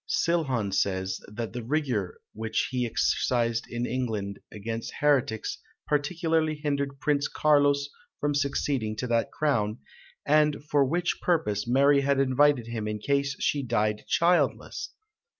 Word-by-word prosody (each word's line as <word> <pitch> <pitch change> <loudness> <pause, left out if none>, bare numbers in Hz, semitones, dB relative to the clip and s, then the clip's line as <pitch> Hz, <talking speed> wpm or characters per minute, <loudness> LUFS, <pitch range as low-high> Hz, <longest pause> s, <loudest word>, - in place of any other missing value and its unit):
Silhon 160 - 0
says, 95 -1 -1
that 110 +2 -6
the 120 -2 -5
rigour 125 - -1
which 110 0 -2
he 125 -2 0
exercised 115 0 0
in 120 +1 -2
England 110 -6 -3
against 115 +2 -5
heretics 140 -6 +1 0.3
partly 160 +1 +1
hindered 140 -2 -2
Prince 145 -1 +1
Carlos 145 -2 +3 0.3
from 145 0 0
succeeding 140 -5 -1
to 110 - -3
that 115 -1 0
crown, 115 -8 0 0.5
and 150 0 +3
for 145 -2 +3
which 175 +6 -1
purpose 105 - 0
Mary 140 +3 +4
had 140 0 +1
invited 135 -1 +3
him 115 -2 -4
in 105 0 -2
case 140 +4 0
she 145 - +1
died 110 -4 0
childless!" 175 +1 +1
135 Hz, 135 wpm, -27 LUFS, 110-145 Hz, 0.5 s, Mary